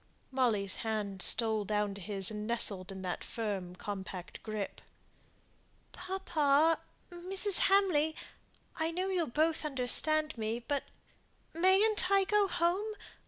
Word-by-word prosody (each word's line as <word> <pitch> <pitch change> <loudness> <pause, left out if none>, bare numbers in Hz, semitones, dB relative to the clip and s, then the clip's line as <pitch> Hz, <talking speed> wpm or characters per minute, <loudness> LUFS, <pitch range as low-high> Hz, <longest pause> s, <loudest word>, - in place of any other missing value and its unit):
Molly's 225 -7 0
hand 210 -4 -3
stole 220 +1 +4
down 210 0 -1
to 200 - -9
his, 195 0 +2
and 210 0 -5
nestled 200 -5 0
in 190 -1 -8
that 180 -1 -4
firm 195 -6 -4
compact 190 -2 -7
grasp. 215 -2 -5 1.1
"Papa! 320 -4 +1 0.3
Mrs. 375 +2 -1
Hamley! 345 -6 +3 0.6
I 320 -1 0
know 365 +3 -2
you'll 360 -4 0
both 310 +6 0
understand 305 +3 +3
me 220 +1 -2
but 275 +4 -3 0.7
mayn't 380 +3 +3
I 395 -1 +4
go 415 +1 +2
home? 380 +5 -1
275 Hz, 120 wpm, -32 LUFS, 210-350 Hz, 1.1 s, stole